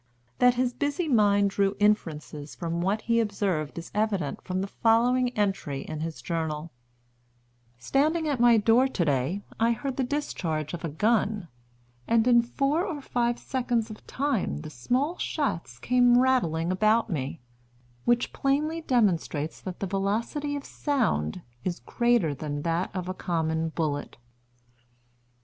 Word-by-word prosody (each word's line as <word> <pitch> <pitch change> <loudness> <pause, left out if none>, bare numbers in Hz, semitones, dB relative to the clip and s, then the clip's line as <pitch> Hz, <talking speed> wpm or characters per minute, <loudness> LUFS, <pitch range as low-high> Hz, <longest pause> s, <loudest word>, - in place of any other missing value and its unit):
That 250 0 +5
his 250 0 0
busy 290 +6 -1
mind 205 -6 +4
drew 200 0 +1
inferences 155 -8 0
from 170 -1 -3
what 200 +4 0
he 230 0 +2
observed 195 -9 -1
is 170 - -7
evident 205 -8 -1
from 185 0 -3
the 195 - -2
following 245 +4 +3
entry 190 -9 -1
in 155 +1 -6
his 160 0 -5
Journal: 160 -1 -3 1.1
"Standing 305 - +1
at 285 -4 0
my 240 -1 +6
door 230 +5 +4
to 190 -10 -1
day, 145 +8 0 0.2
I 230 +1 +3
heard 265 +3 -4
the 265 - +1
discharge 175 - -2
of 175 - -5
a 165 - -2
gun, 210 +2 +1 0.6
and 230 +1 +3
in 240 -1 +6
four 275 +7 0
or 345 -7 -3
five 240 -3 0
seconds 240 -4 -1
of 215 - -12
time 255 - -1
the - - -8
small 255 - -1
shots 175 - -2
came 245 - +4
rattling 185 -11 +2
about 215 +4 +3
me, 145 0 -3 0.6
which 240 0 +1
plainly 300 +4 0
demonstrates 180 - 0
that 185 -1 -7
the - - 0
velocity 215 - -1
of 285 - -5
sound 150 - -1 0.2
is 180 -1 -2
greater 235 - +1
than 145 +1 -4
that 170 +2 0
of 180 -1 -3
a 185 - -2
common 160 -3 -1
bullet." 150 -3 -3
210 Hz, 150 wpm, -27 LUFS, 165-250 Hz, 1.1 s, my